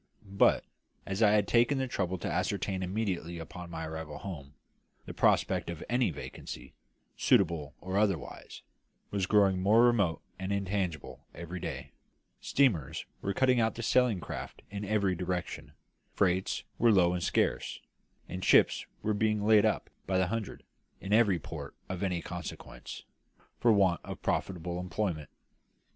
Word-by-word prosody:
But 100 0 +3 0.4
as 95 +2 -3
I 105 -2 +6
had 105 -2 +3
taken 120 +4 +3
the 130 0 0
trouble 95 -6 -1
to - - -4
ascertain 95 -1 -1
immediately 90 -3 -2
upon 85 +2 -8
my 80 -1 -5
arrival 80 -2 -6
home 75 -7 -8 0.5
the - - -7
prospect - - +2
of 85 -2 -5
any 125 0 +2
vacancy, 80 - -8 0.4
suitable 80 -6 +2
or 95 +2 -1
otherwise, 100 -7 -2 0.5
was 100 -3 0
growing 95 -3 +4
more 110 +5 +5
remote 105 -10 +2 0.2
and 95 +1 -3
intangible 95 -5 -2
every 85 +2 -6
day; - - -5 0.5
steamers 115 - +1 0.2
were 100 - -2
cutting 130 -2 +4
out 110 -1 +1
the 115 - -5
sailing 125 -5 +3
craft - - -7
in 100 0 -4
every 100 -2 +1
direction; 90 0 -4 0.4
freights 95 -1 +1 0.2
were 120 -1 +5
low 90 -4 +4
and 90 - -2
scarce; - - 0 0.5
and 90 +1 -6
ships - - +4 0.2
were 110 - +1
being 105 0 +1
laid 110 0 +6
up 110 - -2 0.2
by 95 0 +1
the 95 -1 +2
hundred, 115 -4 -4 0.4
in 95 - -3
every 105 -5 +5
port 75 - -8
of 95 -1 -5
any 90 -4 -1
consequence, 90 -3 -7 0.6
for 120 - +5
want 95 -4 +3
of - - -7
profitable 90 -1 -2
employment. 90 -4 -2
95 Hz, 150 wpm, -30 LUFS, 85-105 Hz, 0.6 s, I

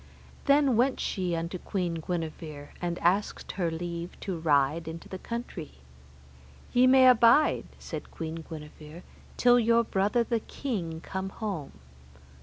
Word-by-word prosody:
Then 280 -1 +4 0.2
she 185 -3 -2
went - - 0
unto 170 +2 -4
Queen 175 -4 -2
Guenever, 155 -3 -5
and 175 -1 -2
asked 190 +4 +1
her 175 -4 -1
leave 170 +1 -5
to 185 -4 -3
ride 155 +1 +2
into 165 +1 -7
the 190 - -7
country. 230 -9 -6 1.0
Ye 250 +1 +6
may 260 0 +7
abide, 250 +4 +5
said - - -7
Queen 165 0 -6
Guenever, 155 +1 -10 0.3
till 245 0 +6
your 235 0 +4
brother 210 +3 +1
the 235 -1 0
king 180 - -4
come 190 +1 -4
home. 195 -8 -5
180 Hz, 135 wpm, -28 LUFS, 165-230 Hz, 1.0 s, may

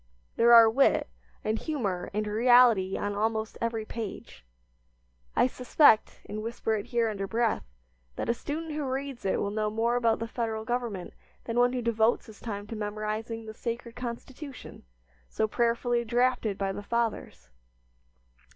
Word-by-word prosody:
There 235 +1 +5
are 230 -1 +10
wit, 260 +5 +3 0.4
and 220 +1 0
humor, 205 - -2
and 215 +1 -1
reality 225 -3 +4
on 205 0 -2
almost 220 +1 -1
every 230 -1 -1
page. 215 - -7 0.9
I - - +5
suspect, 250 -1 +3
and 215 +1 -5
whisper 225 0 -2
it 210 -2 -2
here 235 -2 +1
under 200 -2 -3
breath, 230 +1 0 0.5
that - - -3
a 235 - +3
student 310 +6 -5
who 300 0 -3
reads 265 -2 -4
it 190 - +1
will 200 - -1
know 215 0 0
more 225 +3 0
about 230 -2 +2
the 230 - -4
Federal 225 -2 -3
Government 235 -7 -3 0.3
than 230 +1 -1
one 245 +1 +4
who 250 -1 -2
devotes 225 0 +2
his 220 -3 -14
time 205 -3 -5
to 225 - -7
memorizing 215 +2 -4
the 220 - -7
sacred 235 +1 -5
Constitution, 250 - -8 0.4
so 220 - 0
prayerfully 235 +1 +1
drafted 240 -3 +1
by 195 -1 -1
the 195 - -5
Fathers. 230 - -3
230 Hz, 160 wpm, -28 LUFS, 215-240 Hz, 0.9 s, are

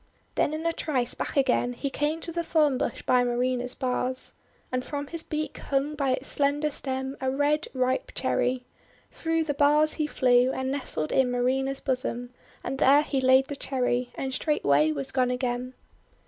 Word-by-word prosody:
Then - - +1
in 320 +1 -5
a 335 - +1
trice 255 -7 -1
back - - -4
again 250 -2 +2
he 275 +3 -4
came 300 +4 -1
to 335 - -3
the 340 +1 -1
thorn 310 -4 +2
bush - - -2
by 250 -1 +3
Marina's 245 +1 0
bars. 255 0 -1 0.4
And 255 0 -1
from 285 +1 -4
his 330 +3 -2
beak 310 -1 -4
hung 275 +2 -1
by 275 -3 0
its 260 - -3
slender 290 +1 +1
stem 265 -1 -3
a 260 - 0
red 290 +4 +1
ripe 255 0 0
Cherry. 250 0 0 0.5
Through 325 0 0
the 300 -2 -1
bars 295 +2 +4
he 305 -2 -1
flew, 250 -2 +3
and 260 0 -2
nestled 255 - -2
in 265 -2 +3
Marina's 265 +2 0
bosom, 250 -2 -2 0.3
and 265 +1 -4
there 285 +3 +6
he 275 -3 -1
laid 260 +1 +5
the 285 - -5
Cherry, 250 -2 -1
and 265 -1 -3
straightway 155 - +2
was 140 -3 -4
gone 255 -2 +2
again. 250 0 -2
265 Hz, 180 wpm, -27 LUFS, 250-290 Hz, 0.5 s, there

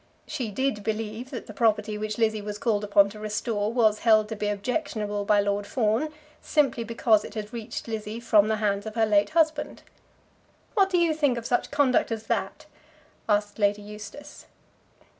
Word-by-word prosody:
She 255 -7 -4
did 210 0 -1
believe 220 +3 -3
that 250 - -6
the 215 - -10
property 215 0 +1
which 215 0 -4
Lizzie 220 -2 +1
was 205 0 -5
called 210 -1 0
upon 200 -1 +4
to 210 +1 -11
restore 215 0 -2
was 220 -3 +3
held 215 -2 +4
to 220 - -4
be 210 0 -2
objectionable 210 -2 -2
by 205 0 +4
Lord 200 0 -1
Fawn 230 +6 +1 0.3
simply 275 -6 +1
because 225 -2 +2
it - - -10
had 215 0 -5
reached 230 0 -6
Lizzie 220 0 -4
from 215 -3 +4
the 220 - +1
hands 205 -1 -1
of 215 - -7
her 225 -1 +3
late 205 -1 +3
husband. 310 -2 0 0.9
"What 390 -4 +3
do 365 - +2
you 340 -2 +3
think 290 -5 +1
of 230 - -5
such 245 0 0
conduct 285 -5 +2
as 220 -1 -3
that?" - - -3 0.6
asked 205 +1 +1
Lady 205 0 +2
Eustace. 210 +6 -10
215 Hz, 180 wpm, -26 LUFS, 210-240 Hz, 0.9 s, upon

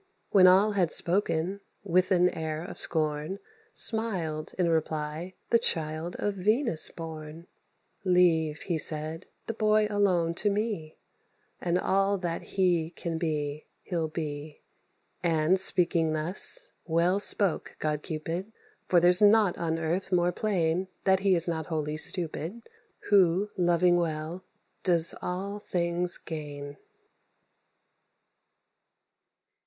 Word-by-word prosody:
When 185 -2 +6
all 195 +4 +5
had 185 -5 0
spoken, 185 +1 +1 0.2
with 185 -1 +1
an 180 -2 +3
air 160 -1 -5
of - - -8
scorn 155 +2 -1 0.3
Smiled, 180 -9 0
in 180 -2 +1
reply, 160 +2 -3 0.2
the 235 - +5
child 160 -3 -1
of 205 - -2
Venus 210 - +3
born: 160 -1 -9 0.6
"Leave," 165 -5 +2
he 170 -4 -2
said, 155 +3 -1 0.2
"the 225 - -4
boy 215 -1 +2
alone 180 -5 +1
to 210 - +2
me, 200 -7 -3 0.6
And 175 0 0
all 195 +2 +1
that 175 -3 -4 0.2
he 175 -4 +2
can 165 -1 -5
be 150 -2 -3 0.2
he'll 165 -3 -2
be." 150 -1 -6 0.6
And, 165 +1 +1
speaking 170 -4 +3
thus, 185 - +2 0.2
well 170 +4 +1
spoke 200 -3 +2
god 150 -1 -2
Cupid; 165 +7 -5 0.4
For 180 - +4
there's 180 +2 +4
nought 210 -2 +4
on 165 -1 -1
earth 170 +4 -3
more 175 -1 +2
plain 180 -2 -1 0.2
That 190 -1 +3
he 195 -1 +2
is 170 0 0
not 160 -2 -3
wholly 155 -2 -3
stupid 175 +6 -1 0.4
Who, 195 0 +3
loving 175 -1 +2
well, 165 +1 -3 0.4
does 170 -3 +4
all 195 +3 -4
things 175 -2 0
gain. 145 -2 -8
175 Hz, 120 wpm, -27 LUFS, 160-190 Hz, 0.6 s, When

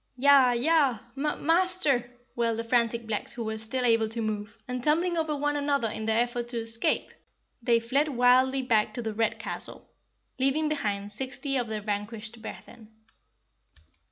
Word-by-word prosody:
"Yah, 265 -1 +5
yah, 275 0 +3 0.2
mah 300 +2 -1
MASTER!" 330 -7 +2 0.3
wailed 230 -1 0
the 230 - -2
frantic 235 0 +1
blacks 220 -2 -3
who 235 - -5
were 220 0 -4
still 250 +3 -1
able 225 -2 +3
to 230 +1 -5
move, 215 -1 -4
and 250 -1 -4
tumbling 335 +4 +2
over 315 -2 -1
one 290 +1 -1
another 280 -5 0
in 220 - -5
their 220 +1 +2
effort 240 0 -3
to 240 - -3
escape, 230 0 -1 0.5
they 235 0 +3
fled 270 +6 +1
wildly 260 0 +3
back 220 -3 +1
to 240 - -4
the 220 -1 -3
Red 225 +1 0
Castle, - - -1 0.5
leaving 275 +4 +2
behind 205 -9 -2
sixty 265 +4 -3
of 245 -3 0
their 215 -1 -4
vanquished 210 +2 -5
brethren. 225 0 -11
240 Hz, 165 wpm, -27 LUFS, 225-275 Hz, 0.5 s, Yah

